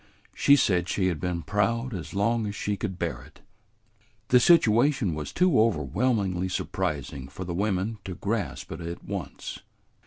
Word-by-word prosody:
She 140 - +5
said 90 -9 +2
she 95 -1 +1
had 85 -4 -3
been 90 -2 -2
proud 115 +4 0
as 90 0 -6
long 110 +2 +1
as 100 - -5
she 105 0 -1
could 95 -2 -4
bear 85 -3 -3
it." - - -17 0.9
The 125 - +7
situation 125 - +4
was 75 -1 -5
too 180 -11 +4
overwhelmingly 95 - +1
surprising 70 -6 -3
for 70 +7 -7
the 85 - -4
women 100 +3 -1
to 95 -2 -5
grasp 105 +1 -3
it 80 - -6
at 85 +1 -6
once. - - -6
100 Hz, 160 wpm, -27 LUFS, 90-115 Hz, 0.9 s, The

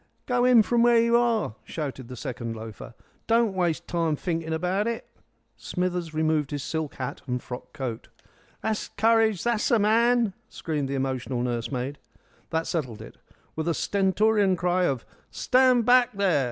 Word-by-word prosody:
"Go 245 -1 +1
in 245 -3 +6
from 235 +2 +1
where 240 0 +5
you 235 +1 +4
are!" 235 - +2
shouted 135 -5 -5
the 125 - -8
second 120 -3 -5
loafer. 110 +1 -9 0.3
"Don't 230 -2 +3
waste 170 -2 -1
time 165 -3 0
thinking 165 0 -3
abart 180 +6 0
it." 235 -1 -3 0.5
Smithers 180 +7 -2
removed 155 -2 0
his 145 -2 -4
silk 160 -2 -3
hat 130 +2 -5
and 125 0 -1
frock 125 +1 -8
coat. 130 -6 -5 0.6
"That's 220 -1 -1
couridge! 220 -2 +2
That's 235 -3 +1
a 235 - +4
man!" 230 +1 +3 0.2
screamed 150 -4 -3
the 140 - -2
emotional 130 -2 -2
nursemaid. 125 +3 -3 0.5
That 160 0 -1
settled 130 -10 -3
it. - - -13 0.4
With 160 +1 -3
a 170 - +1
stentorian 200 0 +2
cry 180 +1 +1
of 135 -7 -1 0.2
"Stand 255 -2 +3
back, 250 0 +5
there!" 195 -6 +2
175 Hz, 160 wpm, -26 LUFS, 135-225 Hz, 0.6 s, in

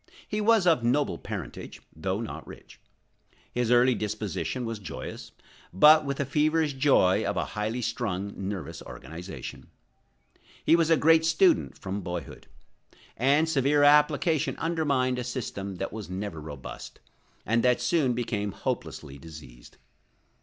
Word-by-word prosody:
He 210 - -2
was 220 -2 +4
of 160 -8 +4
noble 135 +5 +1
parentage, - - -7 0.2
though 95 +6 -2
not 115 - -7
rich. - - -13 0.7
His 120 -2 0
early 125 +1 +5
disposition 105 0 -3
was 115 -2 -4
joyous, 95 - -8 0.4
but 150 - +7
with 140 -1 -2
the 140 - -1
feverish 155 +2 +1
joy 135 -9 +3
of - - -2
a - - 0
highly 110 +4 -2
strung, 100 -4 -3
nervous 95 -5 -5
organization. 90 +4 -9 1.0
He - - +6
was 165 -1 +2
a 165 - +5
great 160 +2 +5
student 330 - +3
from 100 +1 -4
boyhood; 90 -2 -7 0.7
and 140 +6 +3
severe 145 -1 +2
application 150 +1 +3
undermined 140 -6 0
a - - -2
system 110 -6 -5
that 95 +3 -5
was 110 -4 -7
never 95 -4 -5
robust, 75 -4 -9 0.5
and 115 +1 +2
that 125 0 +3
soon 150 -8 +1
became 105 -4 -2
hopelessly 70 -2 -5
diseased. 70 -6 -13
120 Hz, 140 wpm, -27 LUFS, 95-150 Hz, 1.0 s, but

